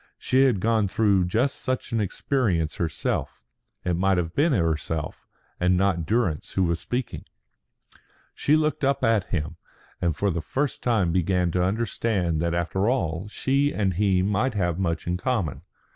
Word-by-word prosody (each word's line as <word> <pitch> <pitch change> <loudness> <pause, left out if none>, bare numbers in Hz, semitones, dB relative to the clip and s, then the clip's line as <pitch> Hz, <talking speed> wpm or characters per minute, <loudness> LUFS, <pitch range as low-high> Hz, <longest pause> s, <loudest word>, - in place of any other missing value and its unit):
She 130 +1 +3
had 120 -7 +2
gone 110 0 +2
through 100 -2 +2
just 115 +10 0
such 130 -2 -3
an 115 -1 +1
experience 95 - 0
herself. 80 -3 -2 0.5
It 90 - +1
might 95 +2 +2
have 85 -1 -2
been 155 +4 +2
herself, 80 - -1 0.3
and 90 +1 +3
not 90 -4 +1
Durrance, 105 -9 0
who 95 - +2
was 85 -1 0
speaking. 125 +6 -4 1.1
She 150 - +2
looked 155 -1 0
up 140 0 +1
at 110 -4 +3
him, 75 -4 -3 0.4
and 85 -4 +1
for 100 +5 0
the 85 -1 -2
first 140 - -2
time 110 -8 +1
began 90 0 +1
to 90 - 0
understand 95 -4 0
that 85 0 0
after 95 +5 0
all 85 -7 -1
she 140 +6 +1
and 100 -3 +1
he 95 0 +2
might 105 +5 0
have 85 -3 0
much 85 -4 -1
in 90 +1 -1
common. 100 - -1
95 Hz, 165 wpm, -25 LUFS, 85-115 Hz, 1.1 s, She